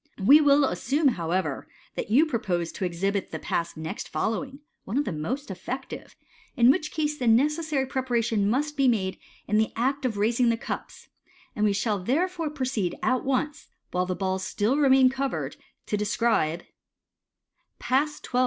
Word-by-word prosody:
We 295 +7 +8
will 285 -1 +5
assume, 285 +2 +1
however, 180 -4 -2 0.3
that - - -4
you 270 +9 +5
propose 185 - -2
to 190 - -3
exhibit 195 +3 -1
the - - -5
Pass 170 -1 -3
next 160 0 -5
following 260 - -3 0.2
(one 215 +7 -3
of 290 - +1
the - - -2
most 210 - -4
effective), 250 +9 -7 0.4
in 240 +1 +6
which 305 0 -1
case 300 -1 -2
the 250 - -1
necessary 295 +4 +2
preparation 235 -6 0
must 295 +6 0
be 275 -2 +3
made 195 -6 0 0.3
in 210 - +2
the 220 - +1
act 270 +5 0
of 235 -5 -1
raising 235 +4 +2
the 230 - +1
cups - - -7 0.2
} 360 -2 -30
and 210 -2 +1
we 205 - +3
shall 205 0 0
therefore 325 - -1
proceed 260 - -2
at 255 -1 +1
once, 275 +3 -1 0.2
while 180 0 0
the 185 - -1
balls 190 0 -2
still 215 +7 0
remain 265 -3 +5
covered, 270 0 -3 0.3
to 210 - -1
describe 210 -6 +1 1.1
Pass 290 +5 0
XII. 250 - -1
245 Hz, 170 wpm, -26 LUFS, 200-280 Hz, 1.1 s, We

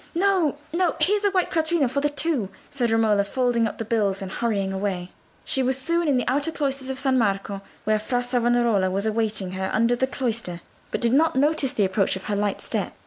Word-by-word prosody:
"No, 365 -5 +2 0.2
no: 345 -1 +1
here's 415 +2 +2
a 405 - +4
white 375 -2 0
quattrino 320 -3 +1
for 270 +3 -1
the 295 - +2
two," 290 - -1 0.2
said 245 -4 0
Romola, 220 -2 +3
folding 240 +1 +1
up - - -7
the 225 - -4
bills 210 -4 0
and 190 -2 -6
hurrying 200 -4 -1
away. 190 -2 -3 0.3
She 265 - +1
was 260 0 +1
soon 335 +5 0
in 280 -3 +3
the 250 - -1
outer 285 +5 0
cloisters 275 -4 -2
of 265 - -3
San 265 -1 +2
Marco, 195 -2 -1 0.2
where 215 0 +2
Fra 245 +3 -1
Salvestro 240 -5 +2
was 195 +3 -1
awaiting 215 -3 -1
her 190 0 -3
under 230 +2 +2
the 260 +2 0
cloister, 230 -10 -3 0.3
but - - -3
did 235 0 +2
not 315 +2 +3
notice 285 0 +3
the 205 - +2
approach 190 +1 +1
of 190 - -7
her 210 - -2
light 205 -1 -1
step. - - -3
240 Hz, 215 wpm, -24 LUFS, 205-280 Hz, 0.3 s, a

